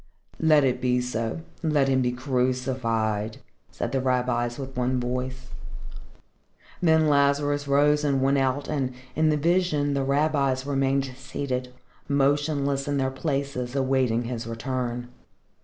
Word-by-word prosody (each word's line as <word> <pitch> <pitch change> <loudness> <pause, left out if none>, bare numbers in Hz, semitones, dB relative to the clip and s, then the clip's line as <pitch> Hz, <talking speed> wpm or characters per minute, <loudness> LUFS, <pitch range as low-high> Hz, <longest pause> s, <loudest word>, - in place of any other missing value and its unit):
"Let 155 -2 +5
it 125 -1 +1
be 125 -1 +2
so. 120 +2 -3 0.2
Let 150 -4 +2
him 130 -1 +2
be 125 -1 +1
crucified!" 125 -4 -1 0.3
said - - -4
the 135 - 0
rabbis 125 -2 0
with 135 -1 -7
one 125 +1 0
voice. 125 +1 -4 1.3
Then 160 -2 +4
Lazarus 145 0 +2
rose 145 +2 +3
and 140 -2 +2
went 135 +1 +2
out, 135 +2 0
and, 130 -4 -2 0.2
in 155 +1 +3
the 150 - +2
vision, 155 -3 +1
the 140 -1 0
rabbis 140 -2 +1
remained 135 -1 +1
seated, 130 -1 -4 0.4
motionless 140 0 +1
in 145 -1 0
their 130 -1 0
places 135 -3 -3
awaiting 130 -3 +1
his 115 -1 -5
return. 120 +1 -3
135 Hz, 135 wpm, -25 LUFS, 125-145 Hz, 1.3 s, Let